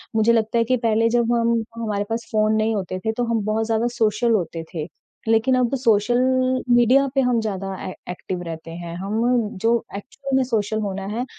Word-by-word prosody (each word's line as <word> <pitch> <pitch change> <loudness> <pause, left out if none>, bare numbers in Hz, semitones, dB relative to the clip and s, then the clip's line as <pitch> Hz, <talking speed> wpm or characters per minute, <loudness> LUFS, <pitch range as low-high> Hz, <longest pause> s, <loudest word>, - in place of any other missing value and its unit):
मुझे 220 +1 +4
लगता 225 +1 +1
है 230 - +4
कि 255 +2 +1
पहले 230 0 +2
जब 235 0 +2
हम 230 -1 +1
हमारे 210 -3 -2
पास 230 +1 -3
फ़ोन 215 -1 +2
नहीं 220 +1 +1
होते 185 -2 -3
थे 220 - +2
तो 245 - +1
हम 220 - 0
बहुत 220 +1 0
ज़्यादा 225 +1 +1
सोशल 220 +1 +2
होते 170 -4 -1
थे। 155 -1 -4 0.4
लेकिन 225 +4 +3
अब 250 +1 +1
सोशल 230 -2 +2 0.6
मीडिया 250 +4 +5
पे 270 - +4
हम 250 -2 +2
ज़्यादा 195 -3 -3
ए 185 - -5 0.2
एक्टिव 180 0 -5
रहते 165 -1 -7
हैं। 170 0 -7
हम 200 +3 -3 0.4
जो 230 +1 +3 0.2
एक्चुअल 270 +6 -5
में 265 - +3
सोशल 220 -3 -1
होना 195 -2 -4
है, 245 +2 -2
220 Hz, 200 wpm, -22 LUFS, 200-235 Hz, 0.6 s, मीडिया